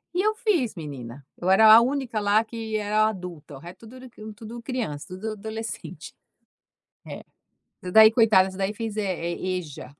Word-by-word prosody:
e 365 - +2
eu 430 +1 +1
fiz, 385 - 0
menina. 140 -5 -9
Eu 180 - -3
era 215 +3 +7
a 230 - +9
única 255 -3 -2
lá, 205 +2 +2
que 225 -1 -5
era 215 +1 +1
adulta, 180 -8 -7
o - - -11
re 175 +3 -11
tudo 230 +3 -15
era 255 0 -12 0.3
tudo 230 +2 -10
criança, 225 - -5
tudo 200 +4 -6
adolescente. 220 +2 -8 0.9
É. - - -8 0.6
Essa 180 -1 -7
daí, 220 0 +8
coitada, 215 -5 +4
essa 190 - -11
daí 195 +2 -2
fez, 220 -1 -6
eh 215 - -1 0.3
eh, 185 +1 -3
EJA. 145 -4 -9
215 Hz, 180 wpm, -24 LUFS, 185-230 Hz, 0.9 s, a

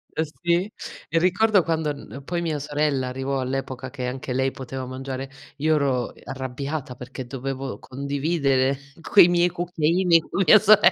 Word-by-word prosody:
Ehm, 160 - +1 0.2
sì. 175 +4 +1 0.4
E 165 - +1
ricordo 185 +2 +3
quando 160 -2 0
n 140 -1 -10
poi 170 +3 -2
mia 155 -3 -1
sorella 145 -2 0
arrivò 135 +1 -2
all'epoca 130 0 -3
che 130 -2 -5
anche 130 0 -4
lei 130 +1 +1
poteva 130 0 -6
mangiare, 130 +1 -5 0.3
io 155 +2 +2
ero, 135 -4 +1
uhm, - - -12
arrabbiata 135 +1 -5
perché 130 +1 -8
dovevo 135 +1 -5
condividere 140 -1 0 0.2
quei 180 -1 +7
miei 175 0 +3
cucchiaini 175 0 +2
con 185 +4 -1
mia 215 - +8
sorella. 210 0 +6
140 Hz, 160 wpm, -24 LUFS, 130-170 Hz, 0.4 s, mia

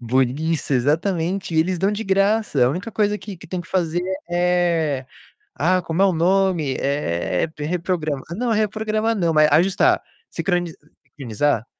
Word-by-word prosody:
boni 130 +6 0
isso, 155 -2 -2
exatamente, 165 +7 0
e - - +2
eles 180 +1 -1
dão 195 +3 +1
de 210 - -3
graça. 195 - +2
A - - +3
única 185 +10 -4
coisa 210 -1 +1
que 205 -2 -9
que 175 - -13
tem 180 +1 -4
que 175 - -12
fazer, 175 -2 0 0.3
é 175 -6 +1 0.5
ah, 185 +1 +2
como 165 +1 -2
é - - +6
o 190 - +2
nome? 175 -4 +1
Eh, 90 - -1
p 150 - -6
reprograma 165 -4 -2
não 240 0 0
é - - +1
reprogramar, 215 +1 0
não, 170 -5 +1
mas 155 0 +5
ajustar, 185 +4 +3 0.3
sincronizar, 145 - -3
175 Hz, 165 wpm, -21 LUFS, 150-195 Hz, 0.5 s, é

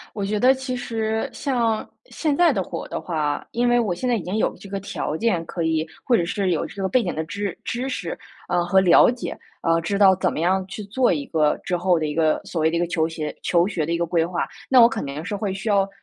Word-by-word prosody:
我 200 -2 -2
觉 210 +1 -1
得 255 +4 +6
其 260 -1 -4
实 225 -2 -2
像 235 -5 0 0.2
现 310 -11 -1
在 350 +3 +4
的 - - -1
火 - - -6
的 - - -4
话， 150 -4 -2
因 240 +1 +1
为 240 0 +4
我 215 -6 0
现 180 +9 -3
在 245 - +3
已 215 - -2
经 185 +5 -3
有 - - 0
这 200 - -12
个 195 0 -3
条 190 -5 -4
件 180 -5 0
可 170 +1 -4
以 160 -1 +1 0.2
或 250 - +4
者 175 - +2
是 190 +1 -1
有 165 - 0
这 200 - -8
个 190 - +1
背 245 +5 +3
景 - - -2
的 160 - -2
知 200 +3 -4
知 250 +3 -3
识， 175 -10 -4 0.3
呃 175 0 +2
和 190 +2 +4
了 185 +4 +6
解， 245 0 -6 0.2
啊， 165 0 +2
知 200 +4 -1
道 195 -2 +7
怎 185 -1 0
么 - - -4
样 185 +3 +1
去 205 +2 -7
做 245 +5 +2
一 145 -4 -1
个 155 -2 +2
之 180 - -1
后 175 -1 +2
的 155 - -1
一 150 -1 -3
个 160 -1 +2
所 165 - -3
谓 160 - +4
的 170 - 0
一 - - 0
个 175 - 0
求 160 -2 0
鞋 155 -2 -5
求 175 0 +3
学 175 -6 -2
的 165 - -3
一 170 - +1
个 170 - 0
规 170 -1 +1
划， 175 0 -2 0.2
那 260 -2 +7
我 230 - +9
肯 250 - -4
定 140 +3 -5
是 205 - -3
会 200 -2 -2
需 195 +4 -6
要 200 -1 +3
190 Hz, 295 characters per minute, -23 LUFS, 165-225 Hz, 0.3 s, 我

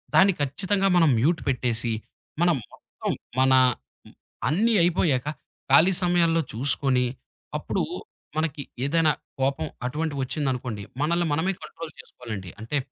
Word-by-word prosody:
దాన్ని 195 0 +6
ఖచ్చితంగా 190 +8 0
మనం 165 -3 +5
మ్యూట్ 160 +7 +2
పెట్టేసి, 120 -3 0 0.5
మనం 175 -1 +4 0.2
మొత్తం - - -6 0.3
మన 130 0 +5 0.5
హ్మ్. - - -18 0.3
అన్ని 220 +9 +2
అయిపోయాక 155 -6 +2 0.4
ఖాళీ 165 +7 +6
సమయాల్లో 170 -2 +3
చూసుకొని 130 +1 +2 0.5
అప్పుడు - - -1 0.5
మనకి 155 -3 -1 0.2
ఏదైనా 160 +1 +3 0.3
కోపం 135 +1 0 0.2
అటువంటివొచ్చిందనుకోండి 130 -5 -2 0.2
మనల్ని 170 +3 +1
మనమే 180 +6 +1
కంట్రోల్ 165 -1 -8
చేసుకోవాలండి. 110 -7 -8
అంటే 115 +7 -2
150 Hz, 110 wpm, -25 LUFS, 130-170 Hz, 0.5 s, దాన్ని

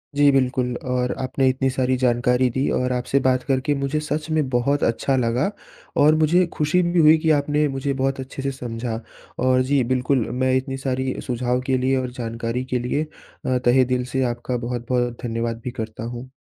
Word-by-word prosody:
जी 145 0 +5
बिल्कुल 125 -2 +1
और 125 0 0
आपने 130 +1 0
इतनी 130 +1 0
सारी 130 0 0
जानकारी 125 0 +2
दी 130 +3 -1
और 125 0 0
आपसे 125 +2 0
बात 130 -1 +1
करके 135 +2 0
मुझे 140 +2 -1
सच 150 +1 -3
में 155 -3 +1
बहुत 135 +3 +1
अच्छा 115 +4 +1
लगा। 125 - +1 0.5
और 150 +2 +5
मुझे 160 +4 +3
खुशी 155 +4 +2
भी 175 0 +1
हुई 155 0 +7
कि 160 +1 0
आपने 150 0 +2
मुझे 135 0 -2
बहुत 135 0 -1
अच्छे 130 +1 -6
से 135 0 -1
समझा 115 -3 -4 0.4
और 130 0 +4
जी 140 -2 +4
बिल्कुल 130 -1 +1
मैं 130 0 +2
इतनी 135 +1 -3
सारी 130 -1 -2
सुझाव 125 0 0
के 130 -1 +1
लिए 130 +1 +1
और 130 -1 -2
जानकारी 115 0 -3
के 125 -1 -1
लिए 125 +5 -1 0.4
अ, 130 -1 +1
तहे 125 +2 +5
दिल 125 0 -1
से 130 0 +1
आपका 120 +1 -4
बहुत-बहुत 120 0 -2
धन्यवाद 115 -1 -2
भी 125 - -4
करता 110 0 -6
हूँ। 120 +2 -6
130 Hz, 195 wpm, -22 LUFS, 125-140 Hz, 0.5 s, हुई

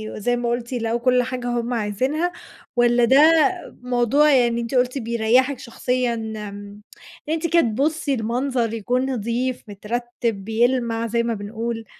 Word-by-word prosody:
وزي 245 +3 0
ما 240 -1 -1
قُلتِ، 240 +1 -3
يلاقوا 230 0 -1
كل 250 0 +3
حاجة 245 0 -4
هُم 240 0 -1
عايزينها 260 - -1 0.4
والّا 240 0 +4
ده 265 +4 +5 0.6
موضوع، 250 +4 +3
يعني 240 -3 +3
أنتِ 235 +3 -4
قُلتِ 250 +2 +1
بيريّحِك 235 +3 +1
شخصيًا 250 +1 -1
آمم، 210 -2 -7 0.5
إن - - +1
أنتِ 330 +1 -1
كده 335 +1 +4
تبُصّي 280 +6 0
المنظر 240 0 -1
يكُون 245 +3 -1
نضِيف، 245 +2 -2
مترتِّب، 230 0 -4
بيلمَع 230 0 +1
زي 235 +1 0
ما 235 - -1
بنقول. 225 +2 -5
240 Hz, 145 wpm, -22 LUFS, 225-255 Hz, 0.6 s, ده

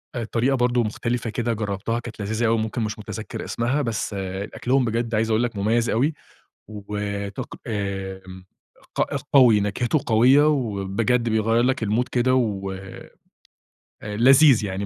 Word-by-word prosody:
الطريقة 120 +3 0
برضو 125 -1 +2
مختلفة 115 +2 -2
كده 120 +1 -1
جربتها 105 +2 -2
كانت 115 -2 -10
لذيذة 110 +3 -1
أو 115 0 +2
ممكن 110 +2 -2
مش 110 0 -3
متذكر 105 +1 -6
اسمها، 120 +5 -1
بس 110 -3 -3 0.4
أكلهم 130 0 +1
بجد 115 0 -1
عايز 110 +1 +1
أقُل 110 +2 +2
لك 120 -3 -2
مميّز 115 +4 +1
أوي 140 +8 +1 0.5
وطق 100 -1 -5
آمم 95 -3 -5 0.5
ق - - +1 0.3
قوي، 120 -6 +7
نكهته 120 +8 0
قويّة 130 +7 +5
وبجد 115 -2 0
بيغيَّر 110 +2 +2
لك 125 -3 0
الـمود 115 +4 0
كده 130 +1 +1
ولذيذ 95 -5 -4 1.4
يعني.، 95 +1 -3
115 Hz, 135 wpm, -23 LUFS, 105-120 Hz, 1.4 s, قوي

